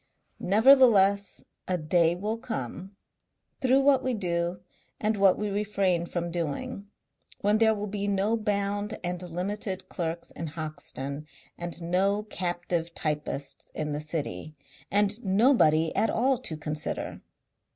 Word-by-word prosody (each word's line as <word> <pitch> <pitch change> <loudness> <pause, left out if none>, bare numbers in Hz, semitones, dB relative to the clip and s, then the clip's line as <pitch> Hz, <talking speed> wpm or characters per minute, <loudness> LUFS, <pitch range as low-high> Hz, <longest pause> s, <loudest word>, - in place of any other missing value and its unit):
Nevertheless 200 -3 +5 0.2
a 185 - +1
day 165 +1 +2
will 210 +5 -3
come 185 - -5 0.7
through 265 +1 +4
what 275 -1 +4
we 255 -2 0
do 175 -2 -1 0.4
and 215 +1 +1
what 195 -2 +4
we 210 - -2
refrain 195 -4 0
from 170 -1 -3
doing 195 - -3 0.5
when 210 +1 +3
there 220 -1 +4
will 205 0 -3
be 205 0 -3
no 200 +3 +1
bound 205 -1 -1
and 175 0 -3
limited 185 +2 -4
clerks 170 -1 -4
in 165 - -5
Hoxton 150 -2 -6 0.3
and 175 0 -6
no 195 +4 +1
captive 175 -3 -3
typists 150 -2 -3
in 150 -1 -2
the 145 +1 -2
city. 155 - -4 0.3
And 205 +3 +1
nobody 190 - +4
at 225 - +2
all 255 +2 +2
to 170 -12 -5
consider." 150 0 -3
190 Hz, 130 wpm, -28 LUFS, 165-210 Hz, 0.7 s, Nevertheless